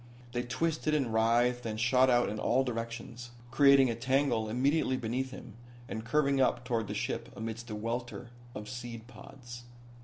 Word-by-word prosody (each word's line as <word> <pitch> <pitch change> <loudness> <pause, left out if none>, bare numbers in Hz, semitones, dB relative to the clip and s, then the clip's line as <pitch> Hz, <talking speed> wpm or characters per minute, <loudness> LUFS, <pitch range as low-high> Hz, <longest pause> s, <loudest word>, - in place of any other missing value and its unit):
They 120 0 -1
twisted 155 +4 -1
and 130 -7 0
writhed 120 +2 +2
and 110 -1 -4
shot 125 +3 +4
out 120 -1 +4
in 105 +1 -4
all 130 +4 +2
directions, 120 0 -5 0.2
creating 140 -3 +6
a - - -3
tangle 130 -2 +1
immediately 130 +3 +1
beneath 125 +2 -2
him 125 -3 -10 0.3
and 110 - -5
curving 140 +2 +2
up 125 -1 +1
toward 115 -4 -1
the 105 - -4
ship - - -3
amidst 115 +2 -6
a 105 - -4
welter 120 +2 -4 0.2
of 105 0 -6
seed 120 -2 -7
pods. 120 0 -11
120 Hz, 165 wpm, -31 LUFS, 115-130 Hz, 0.3 s, creating